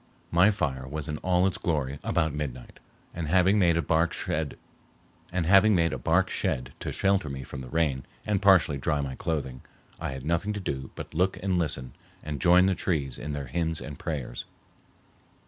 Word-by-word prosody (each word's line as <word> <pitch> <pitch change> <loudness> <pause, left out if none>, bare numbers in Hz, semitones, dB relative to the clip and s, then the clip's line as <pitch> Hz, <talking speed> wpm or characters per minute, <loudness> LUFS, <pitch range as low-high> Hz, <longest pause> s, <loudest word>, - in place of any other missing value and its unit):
My 90 +4 +6
fire 70 -10 -2
was 75 +3 -5
in 75 -1 -3
all 90 0 +2
its 95 -1 0
glory 70 -4 -1
about 80 -2 +1
midnight, 70 -4 -6 0.3
and, 80 -2 -4
having 95 +5 +4
made 85 -3 +4
a 85 - +1
bark 80 +1 +2
shed 75 -2 -2 0.8
to 85 - +2
shelter 95 -5 +1
me 65 -1 -5
from 65 - -8
the 65 - -8
rain 70 -4 0 0.2
and 105 -3 0
partially 90 -8 +5
dry 75 +1 0
my 70 -2 -4
clothing, 65 -4 -3 0.4
I - - -3
had 65 0 -7
nothing 85 +6 0
to 105 - -4
do 65 -8 -4
but - - -8
look 90 +4 +1
and 95 -3 +1
listen 70 -6 -1 0.3
and 75 -3 -5
join 90 +1 +6
the 95 - +3
trees 75 -8 -1
in 75 - -4
their 70 -1 -4
hymns 80 +3 -2
and 75 -3 -8
prayers. 70 -7 -4
80 Hz, 170 wpm, -27 LUFS, 70-90 Hz, 0.8 s, My